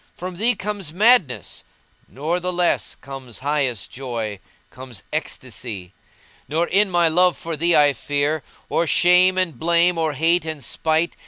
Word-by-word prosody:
From 180 0 -7
thee 230 +5 +2
comes 200 -5 -5
madness; 200 - +2 0.4
nor 160 +6 -2
the 180 +1 -2
less 175 -1 0
* - - -35
Comes 135 -4 -8
highest 140 -6 -1
joy, 115 -6 -5 0.3
comes 125 -8 -9
ecstasy: 120 - -5 0.5
Nor 160 +3 0
in 200 +3 +2
my 175 -2 +3
love 180 +2 +3
for 165 -1 -4
thee 170 +3 +3
I 145 -1 +5
fear 145 +4 -1
* - - -29
Or 170 - 0
shame 180 +2 +5
and 185 -4 -1
blame, 170 +1 +3
or 160 -2 0
hate 165 +4 +2
and 155 -3 -6
spite. 160 +7 0
160 Hz, 160 wpm, -21 LUFS, 135-180 Hz, 0.5 s, I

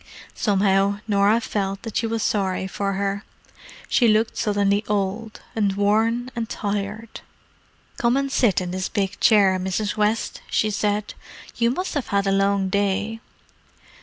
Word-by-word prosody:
Somehow 200 -1 +2
Norah 205 +2 +3
felt 195 -3 -3
that 225 -2 -7
she 230 - +1
was 225 -1 -2
sorry 190 -3 0
for 195 +1 -2
her: 200 +1 -2 0.6
she 240 - +3
looked 220 +1 +2
suddenly 205 0 +1
old, 210 +2 -2
and 205 -3 +1
worn 225 +5 +1
and 230 -1 -3
tired. 210 +1 -4 0.8
"Come 235 +2 +2
and 275 0 -1
sit 220 -9 +2
in 180 -1 -4
this 185 0 -3
big 200 0 -2
chair, 195 -4 +4
Mrs. 190 +3 -2
West," 215 +1 0
she 215 - +1
said. 205 +1 -1 0.4
"You 235 -1 +3
must 365 +10 -2
have 285 -5 -2
had 200 0 +1
a 195 - +1
long 195 0 +2
day." 205 +3 -1
205 Hz, 150 wpm, -23 LUFS, 195-225 Hz, 0.8 s, chair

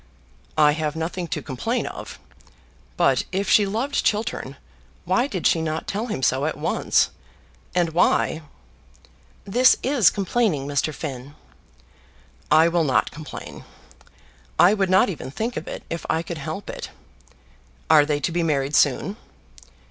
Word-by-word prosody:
"I 150 -1 +6
have 155 0 -2
nothing 170 +2 -3
to - - -4
complain 190 - -2
of. - - -8 0.8
But - - +3
if 195 +1 -1
she 205 0 +4
loved 240 +8 -1
Chiltern, 215 +1 -1 0.5
why 245 +3 +2
did 185 - -5
she 165 - +3
not 160 0 -3
tell 215 +4 -3
him 130 - -4
so 130 +3 +2
at 155 - -2
once? - - +1 0.6
And 175 -2 +2
why 160 -1 +2 0.5
" - - -30
"This 255 +1 +6
is 255 - +4
complaining, 195 - 0
Mr. 145 +2 0
Finn." 140 -2 -7 1.1
"I 160 +2 +6
will 170 0 +1
not 135 -4 +1
complain. 155 -1 -9 0.9
I 175 +5 +6
would 195 -3 0
not 185 +1 +5
even 155 -8 -5
think 225 - -3
of - - -5
it, - - -6
if 170 - -5
I 160 - +1
could 170 -2 -6
help 160 +7 -6
it. - - -6 1.0
Are 155 -2 +6
they 145 0 -1
to 145 - -1
be 175 +1 0
married 145 -3 0
soon?" 155 - +2
165 Hz, 150 wpm, -23 LUFS, 150-200 Hz, 1.1 s, I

